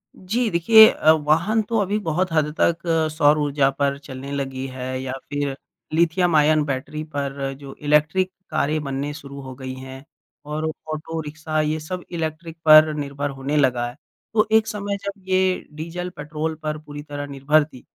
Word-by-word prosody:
जी, 225 +6 -1
देखिए, 220 +5 +8
अ, 155 - +4
वाहन 160 +8 +2
तो 225 +2 -2
अभी 205 +1 0
बहुत 180 -1 -1
हद 150 -1 +1
तक 170 0 +3 0.3
सौर 150 -1 +4
ऊर्जा 145 -2 +2
पर 140 0 0
चलने 140 -1 -8
लगी 135 -2 -3
है 130 0 -5
या 130 -1 -4 0.2
फिर 145 -1 -2 0.4
लिथियम 170 +1 +2
आयन 155 0 +4
बैटरी 145 +2 -4
पर 140 -1 -2
जो 140 -1 -9
इलेक्ट्रिक 150 +5 +2 0.2
कारें 155 0 0
बनने 140 +1 -3
शुरू 140 -2 -9
हो 130 -1 -8
गई 130 0 -6
हैं, 130 +1 -9 0.4
और 150 +1 -3 0.3
ऑटो 160 +1 -5
रिक्शा 155 +1 -3
ये 155 +1 -1
सब 180 +3 -6
इलेक्ट्रिक 165 0 -4
पर 155 0 +8
निर्भर 145 -1 -3
होने 140 +2 -2
लगा 125 -4 +2
है। 120 - -12 0.4
तो 215 0 +3
एक 220 0 +4
समय 205 -1 -3
जब 200 0 -5
ये 185 0 +1
डीज़ल, 170 +4 -5
पेट्रोल 155 -1 -4
पर 155 0 -2
पूरी 145 -1 -8
तरह 145 -1 -6
निर्भर 140 +2 +2
थी, 130 -5 -14
150 Hz, 175 wpm, -22 LUFS, 140-170 Hz, 0.4 s, देखिए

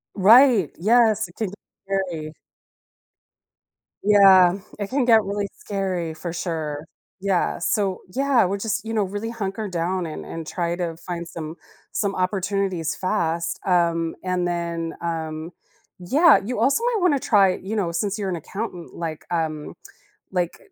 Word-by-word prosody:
Right. 220 - +6
Yes, 220 +1 +4
it 175 - -19
can 220 -4 -2
be 195 - -10 0.3
scary. 180 -6 -3 1.7
Yeah, 195 -3 +6 0.2
it 200 -1 -3
can 270 -1 +1
get 225 -3 +6
really 200 0 -2
scary 185 -5 -3
for 170 +2 -6
sure. 160 -4 -3 0.3
Yeah, 190 -2 0
so, 195 +1 0
yeah, 270 -4 +3
we're 195 +2 -2
just, 220 +2 -2
know, 220 -2 0
really 205 +4 -4
hunker 210 -1 -4
down 180 0 -1
and 155 - -6
and 165 -1 -6
try 170 +1 -2
to 175 -2 -3
find 170 0 -6
some 160 -1 -7 0.4
some 200 -2 -1
opportunities 185 -2 -1
fast, 170 -4 -1
um, 170 -2 +2
and 180 -1 0
then, 170 -1 -3
um, 160 -1 -4 0.5
yeah, 290 - +5
you 240 0 -3
also 275 - +2
might 485 -2 +1
wanna 355 -6 +4
try, 195 -6 +4
you 200 +4 -5
know, 185 -6 0
since 200 +5 -2
you're 195 - -2
an 180 - -1
accountant, 180 +1 -6
like, 160 -2 -5
um, 160 -3 -2 0.6
like, 175 -2 -1
185 Hz, 150 wpm, -23 LUFS, 170-210 Hz, 1.7 s, Right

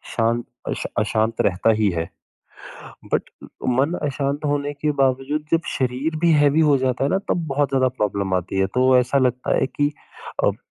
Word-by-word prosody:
शांत 115 +1 +1 0.3
अश - - -3 0.2
अशांत 110 +1 0
रहता 95 +4 +2
ही 105 -1 +2
है। 85 -2 -3 1.0
बट - - 0 0.4
मन 135 +6 +2
अशांत 140 0 -2
होने 145 0 -1
के 145 +1 -2
बावजूद 135 +3 +1
जब 165 - +4 0.2
शरीर 130 +5 -1
भी 170 -1 +4
हेवी 145 +1 +4
हो 150 -3 +4
जाता 130 0 0
है 140 - +1
ना 190 - +2
तब 170 -2 0
बहुत 140 +1 +1
ज़्यादा 130 -1 +2
प्रॉब्लम 100 -6 -2
आती 90 +1 -2
है 95 - +3
तो 130 0 +4
ऐसा 125 +2 +2
लगता 125 -1 +1
है - - +2
कि 145 +2 0 0.5
अब - - +2
130 Hz, 180 wpm, -22 LUFS, 115-145 Hz, 1.0 s, जब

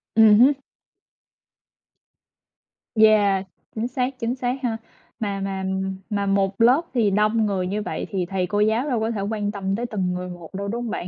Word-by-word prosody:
Ừm 220 -1 +7
hứm. 265 +4 +7 2.4
Yeah. 210 -3 +4 0.3
Chính 225 +2 -1
xác, 255 +1 -3
chính 230 +2 -1
xác 250 -1 -1
ha. 230 -3 -1 0.4
Mà 200 -3 -2
mà 195 -1 -3 0.5
mà 200 -1 -1
một 195 +1 0
lớp 250 +7 +6
thì 225 -5 +2
đông 215 +2 +2
người 190 -3 -1
như 210 +3 -2
vậy - - -4
thì 190 -3 -1
thầy 185 0 -2
cô 205 +3 -1
giáo 220 +7 +2
đâu 245 -4 0
có 220 +1 -1
thể 210 -3 -3
quan 205 0 -2
tâm 195 -1 -2
tới 235 +3 -3
từng 190 -6 -2
người 180 0 -4
một 175 -2 -10
đâu, 200 +1 -4
đúng 235 +3 -3
hông 235 - -4
bạn? 175 - -4
210 Hz, 190 wpm, -23 LUFS, 195-230 Hz, 2.4 s, Ừm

